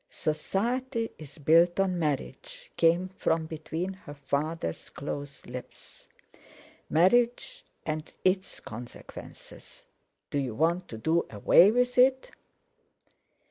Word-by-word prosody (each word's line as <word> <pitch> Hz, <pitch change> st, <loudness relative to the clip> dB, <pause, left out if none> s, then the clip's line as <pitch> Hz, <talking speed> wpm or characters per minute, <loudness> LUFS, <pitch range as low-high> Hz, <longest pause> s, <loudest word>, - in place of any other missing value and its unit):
"Society 230 Hz, -, -1 dB
is 150 Hz, -1 st, -11 dB
built 165 Hz, +4 st, +4 dB
on 185 Hz, -2 st, +1 dB
marriage," 145 Hz, -, -3 dB
came 170 Hz, +2 st, +3 dB
from 165 Hz, -3 st, 0 dB
between 160 Hz, +4 st, -4 dB
her 145 Hz, -6 st, -11 dB
father's 140 Hz, -, -3 dB
close 140 Hz, -1 st, -6 dB
lips; 125 Hz, +1 st, -10 dB, 0.8 s
"marriage 240 Hz, -, +2 dB, 0.2 s
and 155 Hz, 0 st, -4 dB
its 185 Hz, +1 st, +1 dB
consequences. 120 Hz, +2 st, -11 dB, 0.5 s
Do 145 Hz, -, 0 dB
you 130 Hz, -5 st, -3 dB
want 170 Hz, +5 st, +1 dB
to 110 Hz, -, -8 dB
do 160 Hz, +8 st, +1 dB
away 115 Hz, -, +6 dB
with 250 Hz, +2 st, +2 dB
it?" 260 Hz, +1 st, +4 dB
165 Hz, 105 wpm, -28 LUFS, 145-195 Hz, 0.8 s, away